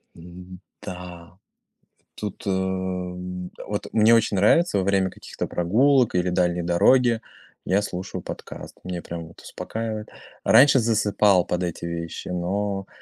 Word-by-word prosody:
М-да. 90 0 -11 0.8
Тут, 105 -1 -7
эм, 90 -1 -3 0.2
вот 105 0 -3
мне 110 +1 +5
очень 110 -3 +2
нравится 105 - +4
во 95 - 0
время 95 -1 +2
каких-то - - -6
прогулок 120 +9 +2
или 90 0 +1
дальней 90 -1 +1
дороги 115 +7 +3 0.4
я 95 +2 +2
слушаю 95 -1 -5
подкаст. - - -9
Меня 90 -2 -5
прям 85 -1 -7
вот 85 - -16
успокаивает. 110 -1 -5 0.4
Раньше 135 0 +7
засыпал 105 -4 +3
под 90 +1 -1
эти 85 -1 -4
вещи, 85 -1 -5
но 95 +2 -2
95 Hz, 125 wpm, -24 LUFS, 90-105 Hz, 0.8 s, Раньше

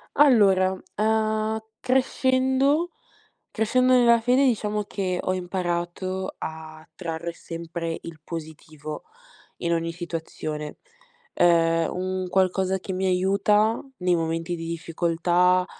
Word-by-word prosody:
Allora, 200 -10 +5 0.3
uhm, 220 0 +1 0.2
crescendo, 265 +4 +2 0.6
crescendo 255 +4 +2
nella 235 -2 +5
fede, 250 +4 +3
diciamo, 210 -4 0
che 185 -3 -2
ho 185 - -1
imparato 180 +1 -3
a 155 0 -8
trarre 170 -1 -4
sempre 165 0 -5
il 160 -2 -9
positivo, 155 -2 -8 0.5
in 170 0 -1
ogni 165 0 -1
situazione. 160 -3 -5 0.6
Ehm, 165 -1 +3
un 185 0 -2
qualcosa 190 +1 +1
che 190 +1 -6
mi 190 +1 -1
aiuta, 200 +4 +2 0.2
nei 180 -1 +2
momenti 165 +1 -1
di 165 0 -6
difficoltà, 175 +2 +1
185 Hz, 105 wpm, -25 LUFS, 165-215 Hz, 0.6 s, Allora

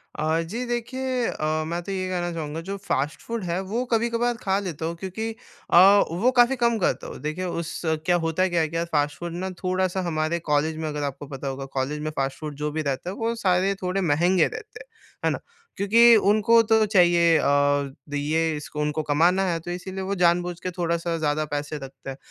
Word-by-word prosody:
अ, 155 +2 0
जी। 225 +10 -4
देखिए 250 +1 -2
अ, 155 +1 -1
मैं 170 +1 -2
तो 195 - -6
ये 185 -1 -2
कहना 175 -1 -2
चाहूँगा 160 0 -4
जो 200 - -3
फ़ास्ट 150 -7 -2
फूड 230 -3 -4
है 175 +1 -1
वो 240 +3 0
कभी-कभार 235 +1 +1
खा 190 0 +1
लेता 170 -5 -5
हूँ 165 +1 -3
क्योंकि 195 +4 -4 0.4
अ, - - +6 0.3
वो 220 +10 +2
काफ़ी 245 +2 +5
कम 235 -2 +2
खाता 185 - 0
हूँ। - - -8
देखिए 155 +5 -3
उस 170 -2 -4
क्या 160 +2 +1
होता 165 +3 +1
क्या 170 -1 +1
है 160 - +1
क्या 165 +1 -2
फ़ास्ट 145 -3 0
फूड 170 -1 -5
ना 185 +2 -3
थोड़ा-सा 185 0 0
हमारे 155 +1 -1
कॉलेज 155 +2 +1
में 160 -1 -3
अगर 150 -1 -3
आपको 140 0 -5
पता 135 0 -6
होगा 135 0 -4
कॉलेज 145 +3 -1
में 155 0 -3
फ़ास्ट 135 0 -2
फूड 150 -2 -6
जो 150 +1 -3
भी 155 +1 -2
रहता 140 +4 -3
है, 195 - -5
वो 230 +1 -1
सारे 190 -2 +1
थोड़े 185 +2 -1
महँगे 175 +2 +3
रहते 425 - -9
हैं। - - -11 0.4
है - - +4
ना? - - -3 0.4
क्योंकि 230 +4 +6
उनको 220 +2 +5
तो 220 -1 +5
चाहिए 175 -5 +4
अ, 145 -1 +2 0.2
ये 155 +2 0
इसको 150 0 -7
उनको 150 +1 -1
कमाना 170 +6 +3
है 170 -2 0
तो 175 +2 -7
इसीलिए 190 +2 -5
वो 200 +1 -2
जानबूझ 175 0 +2
के 185 - -4
थोड़ा-सा 170 0 -1
ज़्यादा 155 0 0
पैसे 145 +1 -3
रखते 135 0 -10
हैं। 135 - -6
170 Hz, 215 wpm, -24 LUFS, 155-195 Hz, 0.4 s, अ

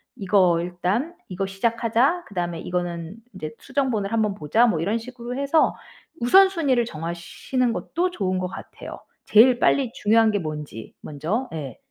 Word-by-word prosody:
'이거 185 -4 +3
일단 180 - -2 0.2
이거 190 +1 -2
시작하자.' 230 - +1
그다음에 175 -4 -3
'이거는 175 +1 -4 0.2
인제 155 -5 -6
수정본을 230 -8 -1
한번 215 -3 +1
보자.' 205 +8 +2
뭐 180 -9 +1
이런 205 +7 0
식으로 245 +1 -7
해서 280 +3 +2 0.5
우선순위를 305 -4 +4
정하시는 170 +8 -3
것도 360 +8 -2
좋은 185 - -1
것 185 - -2
같아요. 185 - -9 0.3
제일 240 +3 +6
빨리 265 -3 +2
중요한 220 +1 +3
게 205 - 0
뭔지 150 - -7
먼저. 180 - -3
예. 140 -6 -6
210 Hz, 330 characters per minute, -23 LUFS, 175-245 Hz, 0.5 s, 제일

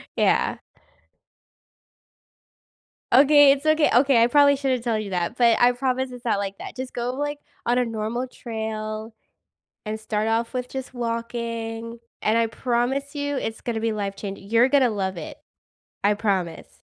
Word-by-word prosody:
Yeah. - - +2 2.5
Okay, 285 +2 +7
it's 280 +2 -2
okay. 310 -1 +4
Okay, 250 -1 +5
I 235 - +6
probably 285 +2 +5
shouldn't 260 -3 -1
tell 230 -2 0
you 210 -2 -5
that, 180 +4 -2
but 235 -2 +5
I 245 +1 +6
promise 260 +1 -1
it's 245 0 -10
not 220 - +2
like 195 -1 -4
that, - - -9
just 260 0 -6
go, 245 +1 -2
like, 290 +1 -3 0.3
on 245 +1 +2
a 250 - +3
normal 230 +2 -3
trail 220 -2 -5 0.7
and 215 +1 -3
start 215 0 -2
off 230 +2 0
with 250 -1 -3
just 260 0 -7
walking, 230 -1 -4 0.2
and 220 +2 +2
I 230 - +2
promise 255 +5 -1
you, 285 -1 -2
it's 225 -2 -4
gonna 230 -2 -3
be 225 0 -1
life 200 -2 -3
changing 200 0 -7
you're 230 +2 +5
gonna 265 -2 +4
love 190 -3 -2
it. 160 - -7 0.7
I 205 - +5
promise. 190 -6 -3
235 Hz, 165 wpm, -24 LUFS, 220-260 Hz, 2.5 s, Okay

